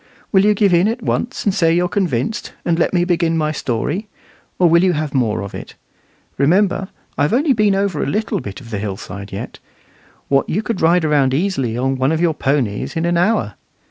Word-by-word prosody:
Will 190 -2 +4
you 210 0 +4
give 200 -2 +3
in 175 +3 +4
at 230 +1 -3
once, 245 +4 -2
and 200 - +2
say 165 -4 +2
you're 175 +1 +2
convinced, 175 - -2
and 170 0 +1
let - - +2
me 175 -1 +2
begin 170 -2 +1
my 155 -1 0
story, 150 - -2 0.5
or 180 - +4
will 170 +1 +4
you 185 -1 +3
have 150 -2 -3
more 110 -8 0
of 100 - -8
it? - - -9 0.6
Remember, 190 +6 +2 0.3
I've 145 +6 +2
only 275 +3 +3
been 210 -4 +2
over 195 -5 0
a - - -1
little 210 +7 -1
bit 100 -1 -7
of 120 -3 -13
the 105 - -2
hillside 100 -1 -6
yet 95 - -7 0.7
what 135 -1 +1
you 210 +6 -1
could 220 -4 -3
ride 170 +2 +4
round 140 -4 +2
easily 135 - -1
on 135 +1 0 0.2
your 170 -2 +2
ponies 135 -8 -1
in 165 +1 -1
an 170 0 +1
hour. 180 - +1
165 Hz, 205 wpm, -18 LUFS, 135-195 Hz, 0.7 s, Will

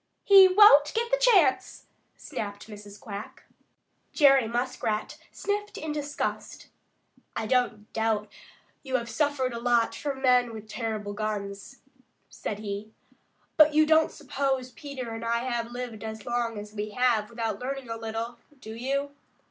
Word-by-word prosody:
"He 390 -2 +9
won't 370 -7 +6
get 470 +1 -1
the - - +4
chance!" 385 - +3 0.3
snapped 205 -1 -6
Mrs. 205 -1 -11
Quack. 205 -1 -8 0.7
Jerry 275 -5 +5
Muskrat 235 -2 -2
sniffed 415 +1 -3
in 310 0 -4
disgust. 295 -1 -4 0.7
"I 220 - -2
don't 230 -3 -1
doubt 220 -1 0 0.5
you 265 -2 -3
have 235 -2 -1
suffered 285 -4 0
a 235 - -4
lot 235 -1 +2
from 275 -2 -5
men 250 -2 +3
with 215 0 -9
terrible 215 -2 -4
guns," 205 +2 -5 0.5
said 205 - -5
he, 210 0 -6 0.7
"but 305 -1 +6
you 310 0 +6
don't 315 0 +4
suppose 270 -3 -2
Peter 260 -3 -7
and 225 0 -6
I 235 +1 0
have 235 -2 -2
lived 245 -3 -6
as 220 -1 -7
long 240 -2 -2
as 210 0 -8
we 210 0 -4
have 235 -4 +2
without 230 -1 -3
learning 270 0 -5
a - - -2
little, 225 +1 -5 0.2
do 220 -3 -9
you? 275 +4 -2
240 Hz, 150 wpm, -27 LUFS, 220-275 Hz, 0.7 s, He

